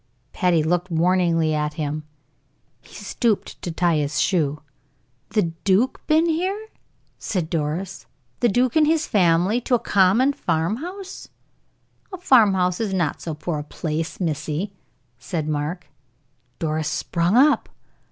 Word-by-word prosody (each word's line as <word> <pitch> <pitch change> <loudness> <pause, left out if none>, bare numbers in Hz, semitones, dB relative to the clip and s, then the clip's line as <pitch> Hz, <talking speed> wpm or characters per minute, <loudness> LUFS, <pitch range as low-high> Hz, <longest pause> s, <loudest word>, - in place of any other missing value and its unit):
Patty 175 -4 +2
looked 175 +3 0
warningly 165 -1 +2
at 150 0 -1
him. 150 0 -3 0.8
He - - -17
stooped 230 -5 -2
to - - -4
tie 170 -1 +1
his 150 0 -1
shoe. 150 -5 0 0.7
"The 205 -7 +1
duke 200 +7 +2
been 315 +2 +4
here!" 380 +7 -1 0.5
said 175 -6 -3
Doris. 170 +4 -3 0.3
"The 240 - +3
duke 245 +4 +1
and 310 -1 +5
his 315 0 +2
family 185 +4 +2
to 245 - +1
a - - +1
common 205 +9 +3
farm 165 - -1
house!" 375 +6 -8 0.8
"A 375 - -6
farm 235 - +5
house 180 -1 +1
is 210 -4 -1
not 170 -6 -1
so 160 -3 -4
poor 155 0 -3
a - - -5
place, 160 +2 -4
missey," 155 +2 -2 0.5
said 155 +5 -3
Mark. 155 +4 -3 0.7
Doris 155 -1 -1
sprung 175 +6 0
up. 290 +4 +4
180 Hz, 140 wpm, -22 LUFS, 160-230 Hz, 0.8 s, and